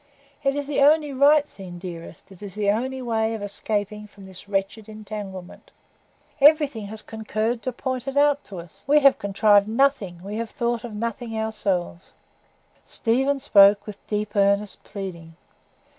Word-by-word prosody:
It 275 0 +1
is 290 0 -2
the 290 0 -2
only 295 0 +4
right 290 +2 +4
thing, 185 -7 -10
dearest; 170 -1 -10
it 190 - -15
is 200 -2 -9
the 205 -1 +1
only 260 +4 -3
way 225 -1 0
of 210 - -6
escaping 210 +1 -3
from 200 -1 -15
this 190 +1 -11
wretched 200 +2 -2
entanglement. 205 -4 -9 0.7
Everything 285 -7 +4
has 215 +1 -7
concurred 220 +1 -3
to 255 - -3
point 255 +1 -4
it 270 +1 -3
out 290 0 +3
to 195 - -9
us. 170 -1 -12
We 295 +1 +5
have 275 -1 +5
contrived 205 0 +3
nothing, 220 -7 0
we 205 +2 -5
have 230 0 -3
thought 235 0 -2
of 230 -3 -7
nothing 230 +1 -4
ourselves." 195 -5 -2 0.7
Stephen 265 +4 0
spoke 205 -5 +5
with 210 -2 -9
deep, 210 0 -3
earnest 200 0 +1
pleading. 170 -5 -8
215 Hz, 160 wpm, -23 LUFS, 200-255 Hz, 0.7 s, We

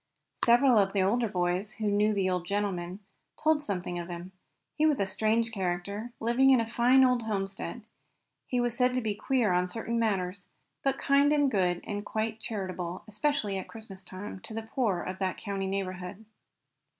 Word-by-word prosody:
Several 240 0 +6
of 195 -1 +2
the 195 -2 +3
older 230 +5 +2
boys, 180 +2 -1
who 220 - -4
knew 210 +1 +3
the 195 -3 +1
old 180 -1 -1
gentleman, 195 -2 -2 0.4
told 310 -1 +2
something 180 -7 -3
of 170 - -5
him. 175 +1 -7 0.4
He 310 +1 +3
was 295 -4 +2
a 200 - +2
strange 220 +4 +1
character, 200 +3 -3
living 240 +4 +3
in 260 -2 +6
a 230 - 0
fine 245 +3 +5
old 250 -1 +3
homestead. 200 +1 -3 0.6
He 250 - 0
was 240 -1 0
said 250 0 +2
to 255 - +1
be 220 -3 -1
queer 225 0 +1
on 180 0 +2
certain 230 +4 -2
matters, 190 -4 -1 0.4
but 275 -1 +1
kind 280 +1 +4
and 290 -2 +3
good, 180 -4 +1
and 205 -1 -3
quite 220 +1 -2
charitable, 185 -5 -4
especially 215 -3 0
at 185 - -7
Christmas 215 -4 -8
time, 190 +2 -7
to 220 - -9
the 225 - -3
poor 220 -6 -1
of 185 0 -5
that 190 -1 -1
country 195 -2 -3
neighborhood. 190 +1 -4
210 Hz, 185 wpm, -29 LUFS, 185-235 Hz, 0.6 s, Several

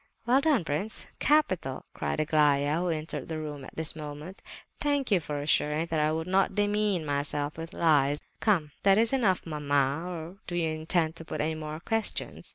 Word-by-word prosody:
"Well 255 +3 +4
done, 285 - +3
prince, 165 +9 -2
capital!" 185 - +1
cried - - -2
Aglaya, 150 -1 +3
who 180 0 -1
entered 155 -3 -3
the 160 - -4
room 150 -3 -6
at - - -11
this 160 -1 -1
moment. 150 +4 -8 0.4
"Thank 285 -4 0
you 195 - +5
for 150 -2 -4
assuming 150 +1 +2
that 160 - +1
I 150 0 +2
would 160 +1 -2
not 190 +1 +2
demean 205 -4 +1
myself 145 +1 -2
with 165 +1 -7
lies. 145 -3 +3 0.2
Come, 170 -9 +2
is - - -39
that 215 +5 +4
enough, 205 -8 +1
mamma, 145 -1 0
or 170 +1 -7
do 175 - -3
you 165 -2 +1
intend 160 +1 0
to 165 - -9
put - - -5
any 160 +2 0
more 155 0 -6
questions?" 225 +3 -2
160 Hz, 185 wpm, -28 LUFS, 150-190 Hz, 0.4 s, you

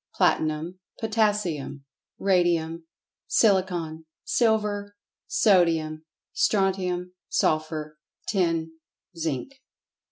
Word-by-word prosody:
Platinum. 160 +4 +1 0.2
Potassium. 210 -11 0 0.3
Radium. 170 -3 +1 0.4
Silicon. 180 -6 +2 0.2
Silver. 210 -3 +1 0.3
Sodium. 165 - +2 0.3
Strontium. 190 -4 +1 0.2
Sulphur. 155 -1 0 0.3
Tin. 165 -4 0 0.4
Zinc. 165 - -4
175 Hz, 60 wpm, -26 LUFS, 160-205 Hz, 0.4 s, Silicon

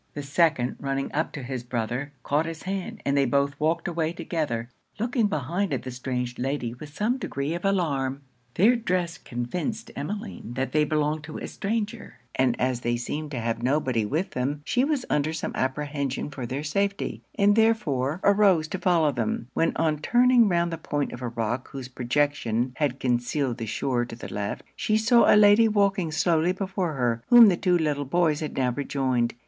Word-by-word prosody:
The 145 - -4
second 145 -3 +1
running 135 0 -2
up 155 +2 0
to 145 - -6
his 130 0 -4
brother, 125 +3 -3
caught 150 +3 +1
his 165 -1 -6
hand, 195 +4 -4
and 140 - +1
they 140 -1 +4
both 140 +3 +1
walked 155 +2 0
away 165 -1 -1
together, 145 -10 -3 0.3
looking 235 0 +1
behind 170 +3 -1
at - - -5
the 130 - -5
strange 125 -1 -4
lady 130 -2 -2
with 145 +4 -10
some 225 - -1
degree 140 - -3
of 175 - -5
alarm. 140 -8 0 0.3
Their 220 +7 +5
dress 180 -7 -1
convinced 175 - -4
Emmeline 180 - -5
that 130 +1 -2
they 155 0 +3
belonged 150 0 0
to 155 - -7
a - - -5
stranger; 225 +2 -3 0.2
and 130 -2 +1
as 130 -1 0
they 120 0 -1
seemed 150 +5 -4
to 135 -4 -4
have 115 0 -2
nobody 130 -3 +1
with 155 - -1
them, 145 +4 -2
she 250 - +2
was 285 -3 0
under 150 +2 0
some 160 - -3
apprehension 140 +1 -2
for 130 -4 -5
their 135 +4 -3
safety, 200 +6 -1
and 205 0 +4
therefore 180 - +1
arose 200 -6 +4
to 190 - -3
follow 170 -5 +3
them, 115 -1 -2
when 165 - +2
on 155 -2 +1
turning 245 +4 +4
round 170 -1 +1
the 165 - -4
point 145 -2 -2
of 120 - -8
a 125 - -2
rock 115 +2 -2
whose 135 -2 -7
projection 130 -2 0
had 140 -3 0
concealed 125 +1 0
the 115 - -4
shore 120 +2 0
to 120 - -9
the 120 - -8
left, 100 0 -3
she 215 - +1
saw 225 +2 +5
a - - +7
lady 210 +2 +7
walking 200 -5 +1
slowly 165 +2 +2
before 190 -3 -2
her, 120 -3 0
whom 240 -3 +9
the 180 - +2
two 180 0 +2
little 150 -3 0
boys 155 +1 +1
had 155 - -5
now 130 -2 +2
rejoined. 130 -3 -1
150 Hz, 190 wpm, -26 LUFS, 130-185 Hz, 0.3 s, whom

